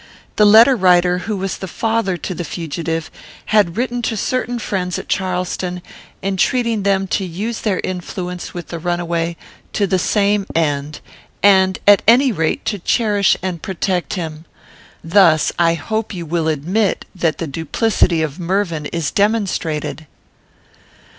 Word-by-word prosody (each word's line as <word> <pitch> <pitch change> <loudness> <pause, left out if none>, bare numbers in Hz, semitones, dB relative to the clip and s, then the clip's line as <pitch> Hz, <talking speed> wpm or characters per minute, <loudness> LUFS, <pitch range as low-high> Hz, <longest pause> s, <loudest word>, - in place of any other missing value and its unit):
The 210 - +6
letter 230 +5 +7
writer, 180 -3 +3
who 210 - -1
was 195 0 -3
father 220 0 -1
to 185 - -5
the 175 - -5
fugitive, 165 0 -4 0.4
had 205 -4 +3
written 245 0 -1
to 225 -1 -2
certain 245 +2 -1
friends 185 -5 -2
at - - -7
Charleston, 180 -1 -2 0.4
entreating 225 +4 +1
them 195 -1 +1
to 195 - 0
use 200 +6 -4
their 200 -5 0
influence 180 0 -5
with 175 -2 -8
the 170 - -5
runaway 170 -1 -2 0.4
to 205 - +1
the 190 -1 +1
same 205 +1 +1
end, 150 -2 -1 0.4
and, 190 -2 +5
at 205 -1 +7
any 255 +3 +6
rate, 165 -6 -1
to 205 - -2
cherish 205 +1 +2
and 180 -4 -3
protect 180 -3 -2
him. 160 -3 -6 0.6
Thus, 165 -2 +4
I 170 -1 +3
hope 215 +6 -3
you 175 -2 -5
will 165 0 -1
admit 175 +8 0
that 165 -5 0
the 165 - -3
duplicity 165 - 0
of 155 +2 -4
Mervyn 170 -4 -1
is 165 -2 -2
demonstrated." 190 -8 -1
185 Hz, 145 wpm, -18 LUFS, 165-205 Hz, 0.6 s, letter